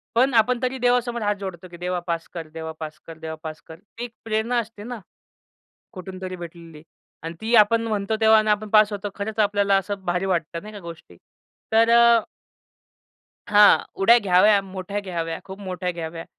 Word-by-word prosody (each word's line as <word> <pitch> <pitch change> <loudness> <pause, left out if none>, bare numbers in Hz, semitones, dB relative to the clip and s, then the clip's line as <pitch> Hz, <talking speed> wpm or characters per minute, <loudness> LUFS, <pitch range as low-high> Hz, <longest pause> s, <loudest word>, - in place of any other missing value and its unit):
पण 255 +3 +3
आपण 235 +2 +3
तरी 255 +1 -1
देवासमोर 245 -1 +1
हात 205 0 0
जोडतो, 185 -2 -7
की 175 - -10
'देवा 180 +1 -2
पास 170 -1 -2
कर, 165 -2 -6
देवा 160 0 -6
पास 155 -1 -7
कर, 165 -1 -9
देवा 160 0 -6
पास 155 -1 -7
कर.' 160 0 -11 0.2
ती 235 - -5
एक 240 - -10
प्रेरणा 225 +2 0
असते 220 -2 -7
ना, 240 +1 -6 0.9
कुठून 185 -1 -9
तरी 185 -1 -5
भेटलेली. 170 -3 -11 0.4
आणि 165 +1 -5
ती 225 +2 -2
आपण 230 +1 +4
म्हणतो 210 0 -1
तेव्हा 220 0 +6
आणि 215 0 0
आपण 210 0 -1
पास 215 0 +5
होतो 205 0 -4
खरंच 215 +2 -5
आपल्याला 200 -1 +2
असं 195 0 -4
भारी 180 +1 0
वाटतं 170 -3 -2
नाही 215 +1 -10
का 205 - -8
गोष्टी. 165 - -11 0.6
तर 225 +1 +5
अ 235 0 +6 1.3
हां. 205 0 +7 0.2
उड्या 230 +5 +6
घ्याव्या, 200 +1 +4
मोठ्या 195 +1 -5
घ्याव्या, 165 -4 -4
खूप 190 +1 -9
मोठ्या 180 -2 -4
घ्याव्या. 165 -1 -6
200 Hz, 185 wpm, -23 LUFS, 175-220 Hz, 1.3 s, हां